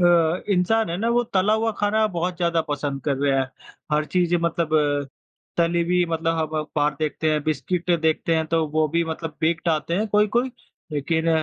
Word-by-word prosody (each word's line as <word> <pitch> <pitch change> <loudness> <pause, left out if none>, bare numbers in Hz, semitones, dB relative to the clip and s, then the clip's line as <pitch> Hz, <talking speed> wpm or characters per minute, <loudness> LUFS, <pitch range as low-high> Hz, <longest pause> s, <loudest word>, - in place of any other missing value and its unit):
अ, - - +4 0.4
इंसान 200 +2 +2
है 170 - -2
ना 225 +4 -1
वो 240 +1 +3
तला 195 +3 +3
हुआ 225 +1 +1
खाना 215 +1 +2
बहुत 175 +1 -2
ज़्यादा 170 -1 +1
पसंद 145 -1 -2
कर 140 -3 +1
रहे 140 0 +1
हैं। 130 -1 0 0.4
हर 150 +1 +2
चीज़ 175 +1 +1
मतलब 170 -1 0 0.9
तली 170 0 +2
हुई 180 +1 +2
मतलब 165 0 0
हम 155 -1 0
म - - -4
बाहर 145 0 +2
देखते 155 +1 -1
हैं, 150 -1 0
बिस्किट 175 +3 -1
देखते 160 +1 +1
हैं 160 0 0
तो 165 0 +1
वो 155 +1 +1
भी 170 +2 +1
मतलब 160 -1 -5
बेक्ड 165 +2 0
आते 160 +1 0
हैं 210 +4 0
कोई-कोई। 210 +5 +2 0.4
लेकिन 160 +3 0
165 Hz, 195 wpm, -23 LUFS, 155-180 Hz, 0.9 s, अ